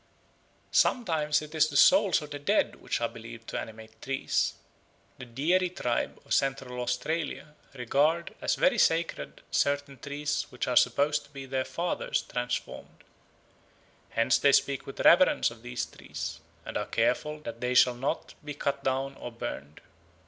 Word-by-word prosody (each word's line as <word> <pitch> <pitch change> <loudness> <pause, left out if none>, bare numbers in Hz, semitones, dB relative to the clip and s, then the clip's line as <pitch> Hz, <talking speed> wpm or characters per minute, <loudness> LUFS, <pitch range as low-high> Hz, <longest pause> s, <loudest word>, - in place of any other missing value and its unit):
Sometimes 155 - +2
it 150 - -10
is 155 -1 +4
the 145 -2 -2
souls 190 +1 +5
of 150 - -10
the 145 - -5
dead 145 - +1
which - - -2
are - - +1
believed 115 0 -11
to - - -3
animate 110 0 -10
trees. 135 0 0 0.6
The 125 - -7
Dieri 170 +10 +1
tribe 125 -10 -2
of - - -2
Central 135 -2 0
Australia 150 +5 -3 0.2
regard 145 +7 +1
as - - +1
very 270 -4 +3
sacred 165 -2 0
certain 140 -1 0
trees 145 +1 -3
which - - -4
are - - 0
supposed 145 +1 +3
to - - -21
be 135 -2 -8
their 130 0 -2
fathers 175 +1 -2
transformed; 125 0 -5 1.1
hence 115 +2 +2
they 140 -1 +4
speak 140 -1 +2
with 135 - -6
reverence 175 -6 +5
of 120 -1 -13
these 120 0 -3
trees, - - -7 0.3
and - - -4
are - - -3
careful 150 0 0
that 115 -4 -8
they 125 0 -1
shall 125 0 +6
not 135 +6 -3
be 145 -1 -6
cut 140 -1 -2
down 135 +1 -1
or 120 - -7
burned. 75 - -7
140 Hz, 160 wpm, -28 LUFS, 125-150 Hz, 1.1 s, shall